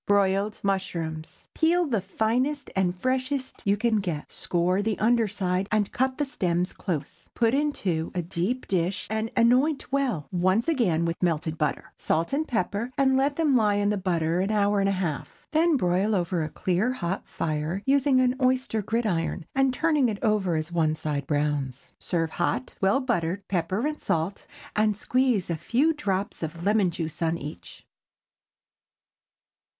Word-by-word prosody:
BROILED 200 Hz, +1 st, +2 dB
MUSHROOMS. 170 Hz, -5 st, -3 dB
Peel 345 Hz, +2 st, +3 dB
the 230 Hz, -9 st, 0 dB
finest 245 Hz, +9 st, -1 dB
and 185 Hz, -1 st, +1 dB
freshest 260 Hz, +4 st, -2 dB
you 200 Hz, 0 st, +3 dB
can 225 Hz, 0 st, +2 dB
get, 175 Hz, -7 st, -3 dB
score 180 Hz, +2 st, 0 dB
the 215 Hz, -1 st, -1 dB
under 230 Hz, 0 st, +3 dB
side, 190 Hz, -1 st, -1 dB
and 215 Hz, -2 st, +1 dB
cut 260 Hz, 0 st, 0 dB
the 290 Hz, -, 0 dB
stems 180 Hz, -8 st, -1 dB
close. 155 Hz, -7 st, -5 dB
Put 230 Hz, 0 st, +2 dB
into 200 Hz, -, 0 dB
a 175 Hz, -, -1 dB
deep 185 Hz, +9 st, -2 dB
dish 180 Hz, 0 st, 0 dB
and 220 Hz, +1 st, -1 dB
anoint 260 Hz, +6 st, +3 dB
well, 255 Hz, -, 0 dB
once 185 Hz, +5 st, +2 dB
and 330 Hz, -, +2 dB
again, 170 Hz, -, +2 dB
with 165 Hz, 0 st, -3 dB
melted 160 Hz, -2 st, 0 dB
butter. 150 Hz, -3 st, -2 dB
Salt 165 Hz, +9 st, 0 dB
and 310 Hz, +3 st, 0 dB
pepper, 215 Hz, +1 st, -1 dB
and 265 Hz, -1 st, +4 dB
let 275 Hz, +2 st, +2 dB
them 300 Hz, -4 st, +2 dB
lie 210 Hz, -4 st, +3 dB
in 205 Hz, 0 st, +1 dB
the -, -, +1 dB
butter 170 Hz, -3 st, 0 dB
an 190 Hz, +2 st, 0 dB
hour 205 Hz, -1 st, +2 dB
and 195 Hz, 0 st, +2 dB
a -, -, +1 dB
half. 175 Hz, -6 st, -4 dB
Then 320 Hz, 0 st, +3 dB
broil 190 Hz, +1 st, +1 dB
over 175 Hz, -2 st, 0 dB
a 155 Hz, -, -2 dB
clear, 190 Hz, +10 st, 0 dB
hot 190 Hz, -5 st, -3 dB
fire, 155 Hz, +5 st, -2 dB
using 275 Hz, -1 st, +3 dB
an 250 Hz, -1 st, +3 dB
oyster 255 Hz, -3 st, +1 dB
gridiron, 190 Hz, -6 st, -1 dB
and 270 Hz, -1 st, +3 dB
turning 300 Hz, -2 st, +2 dB
it 210 Hz, -, -3 dB
over 210 Hz, -6 st, +2 dB
as 155 Hz, +1 st, -2 dB
one 160 Hz, -2 st, +1 dB
side 145 Hz, -3 st, -3 dB
browns. 145 Hz, -3 st, -1 dB
Serve 165 Hz, -2 st, -1 dB
hot, 130 Hz, -, -1 dB
well 195 Hz, +8 st, +3 dB
buttered, 200 Hz, -6 st, -1 dB
pepper 190 Hz, -, -1 dB
and 300 Hz, 0 st, -3 dB
salt, 165 Hz, +5 st, -2 dB, 0.3 s
and 215 Hz, -1 st, +2 dB
squeeze 245 Hz, -6 st, +1 dB
a -, -, 0 dB
few 270 Hz, -, +1 dB
drops 200 Hz, -9 st, -2 dB
of 165 Hz, +1 st, -5 dB
lemon 205 Hz, -1 st, +3 dB
juice 165 Hz, -1 st, -5 dB
upon 165 Hz, 0 st, +1 dB
each. 140 Hz, -, -9 dB
200 Hz, 170 wpm, -26 LUFS, 170-250 Hz, 0.3 s, and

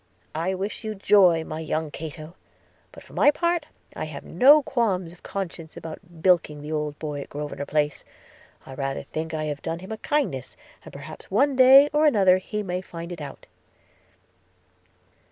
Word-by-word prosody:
I 170 Hz, +4 st, -1 dB
wish 195 Hz, +5 st, -5 dB
you 215 Hz, -1 st, -4 dB
joy, 185 Hz, -5 st, +5 dB
my 155 Hz, 0 st, -6 dB
young 155 Hz, -1 st, -2 dB
Cato; 155 Hz, +1 st, -8 dB, 0.6 s
but -, -, -13 dB
for -, -, -17 dB
my -, -, +5 dB
part, 340 Hz, 0 st, 0 dB, 0.2 s
I -, -, -20 dB
find -, -, -8 dB
I -, -, -1 dB
have 150 Hz, -2 st, -8 dB
no 280 Hz, -, +6 dB
qualms 195 Hz, -10 st, -1 dB
of 175 Hz, -, -19 dB
conscience 170 Hz, -4 st, -6 dB
about 165 Hz, +1 st, -10 dB
bilking 165 Hz, -5 st, +2 dB
the 150 Hz, -, -6 dB
old 150 Hz, -1 st, -2 dB
boy 150 Hz, -2 st, -4 dB
in -, -, -8 dB
Grosvenor 145 Hz, -1 st, -5 dB
Place 150 Hz, -1 st, 0 dB, 0.3 s
– -, -, -28 dB
I 135 Hz, -, -9 dB
rather 135 Hz, 0 st, -3 dB
think 160 Hz, +1 st, -5 dB
I 155 Hz, -, -2 dB
have 145 Hz, -2 st, -4 dB
done 165 Hz, 0 st, -3 dB
him 185 Hz, +4 st, -10 dB
a 220 Hz, -, -4 dB
kindness, 275 Hz, -, -2 dB, 0.3 s
and -, -, -11 dB
perhaps 140 Hz, +3 st, -11 dB
one 270 Hz, +8 st, +2 dB
day 265 Hz, +2 st, +8 dB
or 305 Hz, +1 st, +4 dB
other 190 Hz, -8 st, +5 dB
he 210 Hz, +3 st, -4 dB
may 180 Hz, -1 st, -3 dB
find 170 Hz, -1 st, -8 dB
it 170 Hz, -3 st, -7 dB
out.' 140 Hz, -2 st, -9 dB
170 Hz, 190 wpm, -25 LUFS, 155-210 Hz, 0.6 s, day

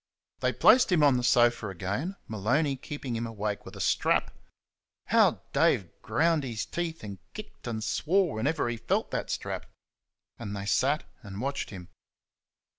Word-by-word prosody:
They -, -, +1 dB
placed 250 Hz, -5 st, +5 dB
him 165 Hz, -4 st, +4 dB
on 140 Hz, -3 st, +5 dB
the 125 Hz, -, -2 dB
sofa 120 Hz, -2 st, +3 dB
again, 100 Hz, -, -3 dB
Maloney 125 Hz, +8 st, +1 dB
keeping 135 Hz, -2 st, -5 dB
him 115 Hz, +1 st, -2 dB
awake 105 Hz, -2 st, -4 dB
with -, -, -10 dB
a -, -, -9 dB
strap. -, -, +1 dB, 0.7 s
How -, -, +4 dB
Dave -, -, +2 dB
ground 165 Hz, -1 st, +2 dB
his 115 Hz, -5 st, -3 dB
teeth 165 Hz, -2 st, -4 dB
and 100 Hz, -2 st, -7 dB, 0.2 s
kicked 215 Hz, -10 st, -9 dB
and 110 Hz, -2 st, -3 dB
swore 165 Hz, -, +1 dB
whenever 140 Hz, +6 st, 0 dB
he 120 Hz, -1 st, -2 dB
felt 115 Hz, -, -1 dB
that -, -, -2 dB
strap! -, -, -4 dB, 0.7 s
And 100 Hz, 0 st, -5 dB
they 100 Hz, -, -5 dB
sat 135 Hz, +8 st, +2 dB, 0.2 s
and 100 Hz, -1 st, -8 dB
watched 135 Hz, +3 st, -2 dB
him. 90 Hz, -3 st, -9 dB
120 Hz, 160 wpm, -28 LUFS, 110-150 Hz, 0.7 s, placed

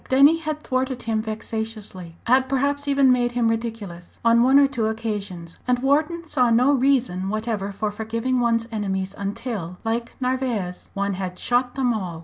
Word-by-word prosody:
Denny 280 Hz, +5 st, +6 dB
had 310 Hz, -1 st, -4 dB
thwarted 255 Hz, -1 st, -1 dB
him 225 Hz, -1 st, 0 dB
vexatiously 215 Hz, -5 st, -5 dB
had 260 Hz, +2 st, +3 dB
perhaps 285 Hz, +1 st, 0 dB
even 275 Hz, -2 st, +4 dB
made 245 Hz, -1 st, +2 dB
him 235 Hz, -2 st, +2 dB
ridiculous 225 Hz, -6 st, -5 dB
on 230 Hz, 0 st, +5 dB
one 260 Hz, +3 st, +5 dB
or 280 Hz, -, +7 dB
two 245 Hz, -6 st, -1 dB
occasions; 205 Hz, -6 st, -4 dB
and 250 Hz, 0 st, +3 dB
Wharton 305 Hz, +6 st, +1 dB
saw 250 Hz, -6 st, +2 dB
no 250 Hz, +5 st, +4 dB
reason 250 Hz, -9 st, +1 dB
whatever 215 Hz, -2 st, -2 dB
for 210 Hz, +1 st, -2 dB
forgiving 230 Hz, +4 st, -1 dB
one's 230 Hz, -1 st, +1 dB
enemies 195 Hz, -3 st, -2 dB
until, 200 Hz, -3 st, -4 dB
like 230 Hz, +1 st, -2 dB
Narvaez, 250 Hz, -8 st, -2 dB
one 200 Hz, 0 st, 0 dB
had 185 Hz, -1 st, -4 dB
"shot 245 Hz, +1 st, +1 dB
them 255 Hz, -3 st, +1 dB
all." 180 Hz, -6 st, -4 dB
230 Hz, 165 wpm, -23 LUFS, 205-260 Hz, -, or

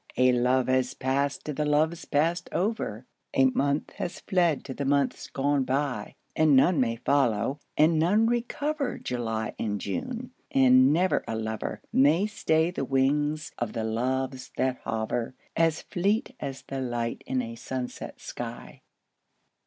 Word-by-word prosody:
A 125 Hz, 0 st, +5 dB
love 125 Hz, +1 st, +2 dB
has 130 Hz, -1 st, +1 dB
passed 140 Hz, +2 st, -1 dB
to 150 Hz, -, -3 dB
the 150 Hz, -, -1 dB
loves 155 Hz, +3 st, +1 dB
passed 165 Hz, +4 st, 0 dB
over, 180 Hz, -, -2 dB, 0.3 s
A 135 Hz, -, +5 dB
month 140 Hz, +2 st, +1 dB
has 180 Hz, -, -4 dB
fled 175 Hz, -6 st, +1 dB
to 135 Hz, -, -5 dB
the 140 Hz, -, -4 dB
months 140 Hz, -1 st, +1 dB
gone 140 Hz, 0 st, +1 dB
by; 135 Hz, 0 st, -2 dB, 0.2 s
And 155 Hz, -3 st, +5 dB
none 150 Hz, +4 st, +5 dB
may 115 Hz, -3 st, +1 dB
follow, 135 Hz, 0 st, +1 dB, 0.2 s
and 155 Hz, +1 st, +4 dB
none 205 Hz, +8 st, +4 dB
recover 275 Hz, +5 st, -1 dB
July 115 Hz, -3 st, -3 dB
and 105 Hz, -2 st, -1 dB
June, 250 Hz, -, -4 dB, 0.2 s
and 130 Hz, 0 st, +6 dB
never 180 Hz, +4 st, +2 dB
a 110 Hz, -, -2 dB
lover 110 Hz, -1 st, -4 dB
May 150 Hz, +8 st, +4 dB
stay 165 Hz, -5 st, +1 dB
the 180 Hz, -, -3 dB
wings 145 Hz, +3 st, +1 dB
of 120 Hz, -3 st, -2 dB
the 115 Hz, -, -2 dB
Loves 130 Hz, +4 st, -2 dB
that 130 Hz, -1 st, +1 dB
hover, 115 Hz, +3 st, -2 dB, 0.2 s
As 165 Hz, -1 st, +2 dB
fleet 210 Hz, +8 st, 0 dB
as 135 Hz, -1 st, -5 dB
the 135 Hz, -1 st, -5 dB
light 120 Hz, -2 st, -3 dB
in 130 Hz, -1 st, 0 dB
a 115 Hz, 0 st, -6 dB
sunset 125 Hz, +1 st, -6 dB
sky. -, -, -7 dB
135 Hz, 155 wpm, -27 LUFS, 125-160 Hz, 0.3 s, and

